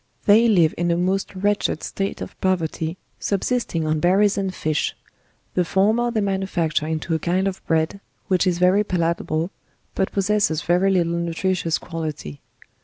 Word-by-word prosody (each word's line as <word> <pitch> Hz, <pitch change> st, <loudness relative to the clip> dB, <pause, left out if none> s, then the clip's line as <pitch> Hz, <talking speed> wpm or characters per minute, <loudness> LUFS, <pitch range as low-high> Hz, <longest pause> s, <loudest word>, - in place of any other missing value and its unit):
They 220 Hz, +3 st, +6 dB
live 175 Hz, -8 st, +4 dB
in 175 Hz, 0 st, +1 dB
a 170 Hz, -, +2 dB
most 190 Hz, +3 st, -1 dB
wretched 205 Hz, -4 st, 0 dB
state 195 Hz, 0 st, -3 dB
of -, -, -6 dB
poverty, 165 Hz, -2 st, -1 dB, 0.2 s
subsisting 200 Hz, -5 st, -1 dB
on 155 Hz, 0 st, 0 dB
berries 195 Hz, +4 st, +3 dB
and 195 Hz, -2 st, -1 dB
fish; 155 Hz, -4 st, -1 dB, 0.6 s
the 180 Hz, -, +2 dB
former 215 Hz, +7 st, +2 dB
they 225 Hz, -2 st, 0 dB
manufacture 190 Hz, -6 st, -1 dB
into 160 Hz, +1 st, -2 dB
a 160 Hz, -, +1 dB
kind 185 Hz, +4 st, 0 dB
of 190 Hz, -1 st, -4 dB
bread, 160 Hz, +4 st, 0 dB, 0.3 s
which 185 Hz, 0 st, +2 dB
is 175 Hz, -1 st, +1 dB
very 185 Hz, +3 st, +4 dB
palatable, 170 Hz, -2 st, -1 dB, 0.4 s
but 190 Hz, -, -1 dB
posssses 195 Hz, -5 st, +1 dB
very 180 Hz, +3 st, +2 dB
little 170 Hz, -3 st, +1 dB
nutricious 170 Hz, 0 st, -1 dB
quality. 155 Hz, -, -6 dB
180 Hz, 155 wpm, -22 LUFS, 165-195 Hz, 0.6 s, They